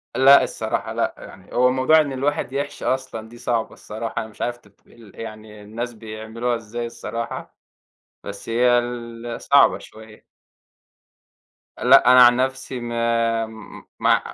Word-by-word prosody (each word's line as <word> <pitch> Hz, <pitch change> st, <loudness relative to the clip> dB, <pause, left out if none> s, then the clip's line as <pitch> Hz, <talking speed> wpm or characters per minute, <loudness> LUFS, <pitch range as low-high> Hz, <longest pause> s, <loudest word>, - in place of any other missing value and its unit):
لأ 135 Hz, +1 st, +7 dB
الصراحة، -, -, -3 dB
لأ، -, -, -1 dB
يعني 95 Hz, 0 st, -13 dB
هو 125 Hz, +1 st, +4 dB
موضوع 130 Hz, +5 st, +4 dB
إن 145 Hz, -2 st, -3 dB
الواحد 135 Hz, -1 st, -2 dB
يحشي 140 Hz, +1 st, -4 dB
أصلًا 130 Hz, -4 st, -3 dB
دي 120 Hz, -, -13 dB
صعبة 120 Hz, -2 st, -2 dB
الصراحة، 110 Hz, +1 st, -7 dB
أنا 110 Hz, -, -7 dB
مش 105 Hz, -, -15 dB
عارف 120 Hz, 0 st, -2 dB
ت 105 Hz, -4 st, -27 dB
ال 115 Hz, -4 st, -17 dB
يعني 110 Hz, -1 st, -9 dB
الناس 115 Hz, +4 st, -6 dB
بيعملوها 110 Hz, +2 st, -4 dB
إزاي 115 Hz, +1 st, -5 dB
الصراحة، 115 Hz, 0 st, -6 dB, 0.7 s
بس 100 Hz, +2 st, -8 dB
هي 120 Hz, +1 st, +3 dB
ال 120 Hz, -1 st, -5 dB
صعبة 140 Hz, 0 st, +5 dB
شوية. 110 Hz, 0 st, -15 dB, 1.5 s
لأ 125 Hz, 0 st, +6 dB
أنا 125 Hz, 0 st, +9 dB
عن 120 Hz, 0 st, +6 dB
نفسي 130 Hz, 0 st, -2 dB
ما 115 Hz, -1 st, 0 dB, 0.5 s
ما -, -, +3 dB
120 Hz, 140 wpm, -22 LUFS, 110-125 Hz, 1.5 s, أنا